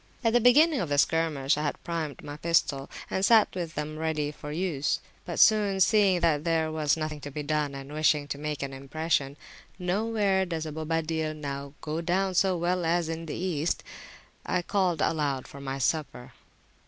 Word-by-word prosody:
At 225 -1 +2
the 240 - +5
beginning 290 +6 +5
of 175 - -2
the 145 - +1
skirmish 150 -2 +2
I - - -1
had 145 -1 -3
primed 160 -5 -4
my 145 - -7
pistols, 150 -4 0 0.2
and 190 - -1
sat 220 +1 +5
with 170 -3 -5
them 150 +1 -4
ready 155 -2 -1
for 150 0 -8
use. 155 -4 -1 0.3
But 175 - -4
soon 205 -3 +5
seeing 195 -3 +4
that 155 -3 +2
there 160 -1 +1
was 155 -1 +1
nothing 155 -1 -4
to 145 - -6
be 150 +1 -5
done, 150 -1 -1
and 135 +1 -8
wishing 150 -1 +2
to 140 - -4
make 150 -1 -3
an 135 -1 -5
impression, 140 +1 -1 0.4
nowhere 195 +1 +1
does 165 -2 -3
Bobadil 160 0 -2
now 140 -1 -6
go 155 +2 -3
down 185 +3 0
so 185 0 +2
well 175 +1 0
as 165 0 +1
in 165 0 -5
the - - -4
East,I 175 +1 -4
called 185 -5 +1
aloud 145 -5 0
for 140 - -11
my 135 0 -4
supper. 135 -2 -2
160 Hz, 180 wpm, -28 LUFS, 145-180 Hz, 0.4 s, the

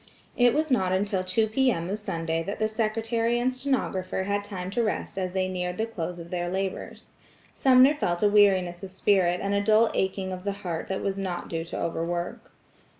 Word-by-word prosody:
It 245 -1 +4
was 310 -1 0
not 190 -7 +2
until 190 0 0
two 185 +4 +2
P.M. 220 -6 +1
of 200 +3 -3
Sunday 165 -5 -2
that 200 +5 -4
the 215 - +1
secretary 225 +2 0
and 255 +1 +1
stenographer 255 -9 -1
had 205 +1 -1
time 185 -2 -6
to 235 - 0
rest 215 -1 -2
as 185 -2 -3
they 190 -1 0
neared 180 -1 -3
the 220 - 0
close 180 -6 -5
of 170 0 -10
their 175 -1 -2
labors. 190 +1 -4 0.4
Sumner 260 +1 +6
felt 175 - -1
a - - +6
weariness 190 -4 +3
of 195 - -6
spirit 185 -2 +2
and 200 0 0
a 200 - +2
dull 220 +2 +4
aching 190 0 -1
of 180 0 -7
the 200 0 -1
heart 165 -2 -3
that 190 - -3
was 195 0 -2
not 180 -3 -4
due 165 0 -3
to - - -5
overwork. 170 +1 -3
195 Hz, 205 wpm, -26 LUFS, 180-220 Hz, 0.4 s, Sumner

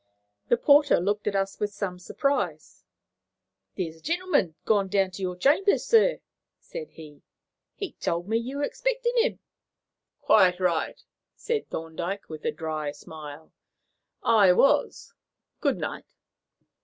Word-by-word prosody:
The 240 - +3
porter 285 +2 +5
looked 205 +4 -1
at 205 - 0
us 195 0 -1
with 210 0 -1
some 190 -3 -4
surprise. 275 +9 -2 0.9
"There's 165 -4 -3
a - - -21
gentleman 340 - 0
just - - -50
gone 205 -3 +2
down 195 -1 +1
to 185 - -9
your 180 -1 -2
chambers, 300 - +3
sir," 460 +2 +4 0.4
said 485 -2 -8
he. 150 -3 -13 0.5
"He 395 - -5
told 170 +2 -3
me 225 +2 +1
you 255 +4 -5
were 290 - -1
expecting - - -1
him." 475 +2 +2 0.8
"Quite 185 -4 +4
right," 175 -3 0 0.4
said 460 -2 -3
Thorndyke, 170 +5 -5
with 155 -1 -8
a - - +1
dry 155 -3 -4
smile, 150 0 -11 0.7
"I 205 -5 +5
was. 275 - +2 0.5
Good - - +1
night." - - -6
195 Hz, 140 wpm, -26 LUFS, 170-285 Hz, 0.9 s, porter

